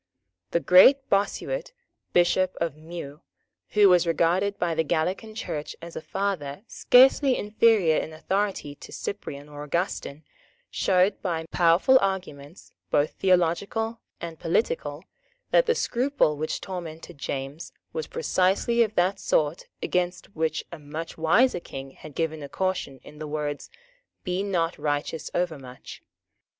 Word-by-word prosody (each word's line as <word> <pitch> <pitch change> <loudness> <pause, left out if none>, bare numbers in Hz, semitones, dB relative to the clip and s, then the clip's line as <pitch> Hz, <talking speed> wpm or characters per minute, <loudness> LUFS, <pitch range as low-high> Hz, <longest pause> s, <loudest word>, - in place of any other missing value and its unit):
The 170 - +1
great 260 +11 +6
Bossuet, - - -1 0.4
Bishop 180 +1 +2
of 165 -4 -1
Meaux, 155 -1 -9 0.5
who 210 -1 +6
was 180 -2 +5
regarded 175 +5 +1
by 170 -2 0
the 160 - +1
Gallican 185 +8 -1
Church 150 -8 -5
as 170 0 -10
a - - -4
father 190 -5 -3
scarcely 260 +3 +5
inferior 210 -6 +3
in - - -3
authority 190 -1 -2
to - - -13
Cyprian 145 -8 -6
or 145 0 -9
Augustin, 155 -2 -3 0.5
showed, 190 +1 +2
by 165 -4 -2
powerful 175 +10 +5
arguments, 180 -5 -4 0.2
both 145 +1 +2
theological 195 +6 0 0.2
and 165 -1 -7
political, 160 -4 -1 0.5
that - - +4
the 470 - +3
scruple 255 - +1
which 155 +2 -3
tormented 165 -5 -7
James 140 +4 -5 0.2
was 475 -1 -3
precisely 235 - +1
of 215 -2 +1
that 185 +2 +2
sort 150 +2 0 0.2
against 180 +2 -2
which 160 -1 -1
a 170 - -8
much 155 +3 -7
wiser 195 +8 +3
King 135 -4 -8
had 150 +1 -13
given 160 -2 -2
a 140 - -7
caution 185 -8 -2
in 150 - -13
the 155 - -5
words, 150 -1 -4 0.5
"Be 180 0 -1
not 175 -4 -1
righteous 145 +1 -2
overmuch." 140 -8 -4
175 Hz, 135 wpm, -26 LUFS, 155-200 Hz, 0.5 s, great